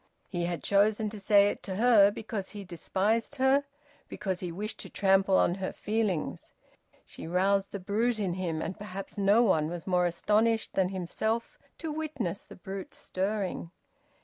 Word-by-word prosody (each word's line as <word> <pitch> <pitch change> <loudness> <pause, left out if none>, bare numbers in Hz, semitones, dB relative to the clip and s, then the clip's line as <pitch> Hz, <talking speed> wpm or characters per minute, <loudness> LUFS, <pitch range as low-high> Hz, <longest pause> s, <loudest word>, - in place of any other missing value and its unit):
He 175 -2 -2
had 175 -1 -3
chosen 210 +1 +2
to 215 - -7
say 200 0 +5
it - - -5
to 190 - -4
her 215 -2 +6
because 205 -1 -5
he 205 -2 -8
despised 195 - -1
her, 270 +1 +3 0.4
because 190 -4 -3
he 180 -2 -4
wished 210 +5 -4
to - - -8
trample 195 -1 +3
on - - +3
her 190 - -2
feelings. 210 -6 -2 0.5
She - - -9
roused 195 +3 +2
the 200 - -4
brute 220 +5 0
in 190 -4 0
him, 170 -3 -2
and 170 +3 -4
perhaps 195 0 -7
no 200 +4 +5
one 160 -8 +2
was 175 -1 -6
more 180 -2 +2
astonished 215 +6 +1
than 185 -1 +2
himself 220 +5 -2 0.2
to 325 -2 -4
witness 290 - -3
the - - -13
brute 190 +1 -7
stirring. 190 -2 -2
200 Hz, 170 wpm, -29 LUFS, 185-220 Hz, 0.5 s, her